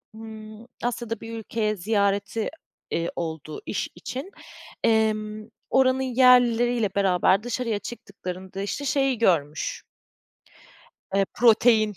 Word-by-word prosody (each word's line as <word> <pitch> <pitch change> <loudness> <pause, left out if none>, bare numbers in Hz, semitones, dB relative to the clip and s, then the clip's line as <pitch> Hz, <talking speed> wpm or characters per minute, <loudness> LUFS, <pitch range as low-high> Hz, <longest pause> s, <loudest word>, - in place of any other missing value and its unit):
ımm, 220 0 -10 0.2
Asya'da 235 -2 -2
bir 225 0 -6
ülkeye 215 -1 -1
ziyareti, 200 +1 0 0.4
eee, 170 0 -1
oldu 160 -2 -5
iş - - -2
için. 275 +10 -6 0.5
Emm, 215 -1 +1 0.2
oranın 260 0 +3
yerlileriyle 245 -3 +4
beraber 195 0 +3
dışarıya 235 -3 -2
çıktıklarında 190 -4 -7
işte 285 +8 -3
şeyi 270 -2 +1
görmüş 155 -9 0 1.3
eee 195 0 +3
protein. 225 -2 +5
220 Hz, 100 wpm, -25 LUFS, 200-240 Hz, 1.3 s, protein